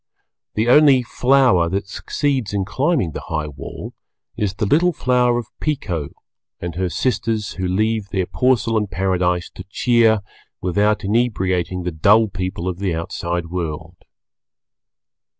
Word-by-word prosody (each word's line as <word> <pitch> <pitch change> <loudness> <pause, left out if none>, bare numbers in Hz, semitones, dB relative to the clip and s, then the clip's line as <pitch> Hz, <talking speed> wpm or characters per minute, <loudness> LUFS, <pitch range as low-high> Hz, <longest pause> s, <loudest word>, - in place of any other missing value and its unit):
The 110 +2 +1
only 135 -1 +6
Flower 125 -8 +3
that 100 +2 -2
succeeds 130 +1 -2
in 95 -2 0
climbing 125 - 0
the - - -6
high 75 -1 -2
wall 70 -2 -8 0.4
is 105 -4 -2
the 105 - -1
little 165 - +3
flower 125 -3 +2
of 120 - -3
Pekoe 95 - -2 0.5
and 85 -1 -5
her 90 +2 -1
sisters 110 - -1
who 95 -1 -3
leave 110 +2 0
their 95 -2 -1
Porcelain 115 -2 +1
Paradise 90 -1 0
to 95 - -10
cheer 115 -1 +3 0.4
without 100 +3 +1
inebriating 95 -5 0
the 90 - -2
dull 105 +7 +4
people 90 -1 -4
of 90 -1 -3
the 95 -4 -1
outside 85 +1 -3
world. 85 -1 -5
100 Hz, 135 wpm, -20 LUFS, 90-120 Hz, 0.5 s, only